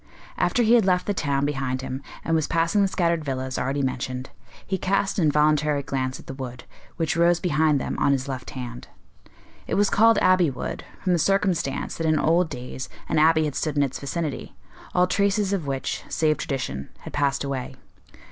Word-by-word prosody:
After 245 - +2
he 225 +1 +4
had 235 -2 +6
left 180 -1 +2
the 205 - 0
town 140 -6 0
behind 135 -3 -2
him, 130 +1 -4 0.2
and 165 - 0
was 160 -2 +2
passing 170 +5 +2
the 200 - +4
scattered 170 -3 0
villas 130 -2 -3
already 135 +2 -1
mentioned, 130 0 -3 0.3
he 190 -1 -2
cast 195 +2 0
an 165 - +3
involuntary 150 -1 +2
glance 130 -1 -2
at - - -13
the - - -7
wood, 125 -2 -7 0.3
which 165 -1 -1
rose 170 +1 +4
behind 155 -4 +2
them - - -3
on 140 - +3
his 135 -1 0
left 130 -2 -5
hand. 125 -1 -7 0.8
It - - -1
was 205 0 +3
called 225 +1 +5
Abbey 185 -5 +4
Wood, 130 - -5 0.2
from 185 - +2
the 175 - +2
circumstance 185 -6 0
that 165 - -1
in 155 0 +3
old 165 +3 +2
days 125 -1 -6 0.2
an - - +2
abbey 160 0 +5
had 150 - -2
stood 150 0 -2
in 145 - +4
its 135 - -3
vicinity, 150 +1 -4 0.4
all 180 - +5
traces 200 +1 +1
of 175 -7 -2
which, 135 -1 -3
save 155 -1 +1
tradition, 100 - -4
had - - -9
passed 140 -1 +1
away. 135 -1 -4
150 Hz, 195 wpm, -24 LUFS, 135-180 Hz, 0.8 s, had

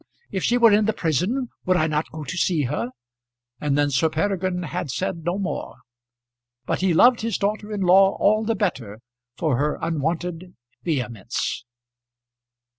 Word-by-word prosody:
If 190 -2 -2
she 245 - +3
were 230 -2 +6
in 210 +1 +4
the 220 - +1
prison, 185 - 0 0.2
would 185 0 +4
I 155 - +2
not 155 0 -1
go 155 -1 -7
to 165 - -5
see 170 -3 +1
her?" 125 -2 -2 0.7
And 145 -1 0
then 145 0 +2
Sir 140 +4 +2
Peregrine 180 +2 -1
had 145 -2 -4
said 170 +4 -3
no 175 +3 -1
more, 195 -2 -4 0.9
but - - -1
he 190 -1 +2
loved 240 +9 +5
his 225 -2 -1
daughter 210 +1 -2
in 205 -2 -3
law 190 +2 +5
all 215 +2 +3
the 225 +1 0
better 125 - -3 0.4
for 155 -7 +1
her 150 +1 0
unwonted 165 +3 -3 0.3
vehemence. 125 - -3
175 Hz, 165 wpm, -23 LUFS, 150-200 Hz, 0.9 s, were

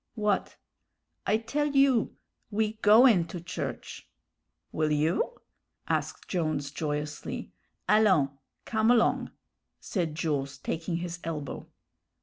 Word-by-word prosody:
"What?" 210 -3 0 0.7
"I 215 - +4
tell 280 +7 -1
you. 275 -4 +4 0.3
We 215 0 0
goin' 215 -4 +6
to 175 - -6
church!" 170 - -6 0.6
"Will 155 -1 0
you?" 160 - 0 0.5
asked - - -2
Jones, 155 -5 -1
joyously. 150 -1 -4 0.4
"Allons, 190 -9 +4 0.3
come 220 0 +1
along," 240 -2 +3 0.5
said 170 -6 -2
Jules, 145 -4 -2
taking 165 +1 -3
his 175 0 -4
elbow. 155 -4 -5
175 Hz, 105 wpm, -28 LUFS, 155-220 Hz, 0.7 s, goin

